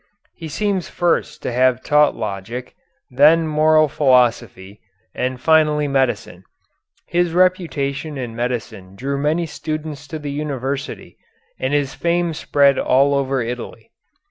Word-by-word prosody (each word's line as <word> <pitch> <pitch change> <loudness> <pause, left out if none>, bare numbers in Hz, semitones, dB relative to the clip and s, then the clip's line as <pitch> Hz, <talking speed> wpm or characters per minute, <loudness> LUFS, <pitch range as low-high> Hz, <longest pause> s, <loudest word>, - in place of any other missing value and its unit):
He 165 - -9
seems 195 +2 -2
first 175 -1 -1
to - - -2
have 130 +1 +2
taught 150 0 +3
Logic, 110 +5 -6 0.4
then 155 +6 +5
Moral 155 0 +3
Philosophy, 120 -8 +1 0.3
and 130 0 -3
finally 150 0 +3
Medicine. 130 -9 -1 0.6
His 175 -1 0
reputation 160 -5 0
in 120 -3 -5
medicine 115 -6 -4
drew 140 +5 -3
many 155 +4 0
students 155 -2 -6
to 160 - -6
the 145 -2 -6
university, 140 -2 -5 0.4
and 130 - -1
his 145 -2 0
fame 170 0 0
spread 140 -2 +2
all 140 +2 +3
over 135 -2 0
Italy. 120 +1 -7
140 Hz, 125 wpm, -20 LUFS, 125-155 Hz, 0.6 s, then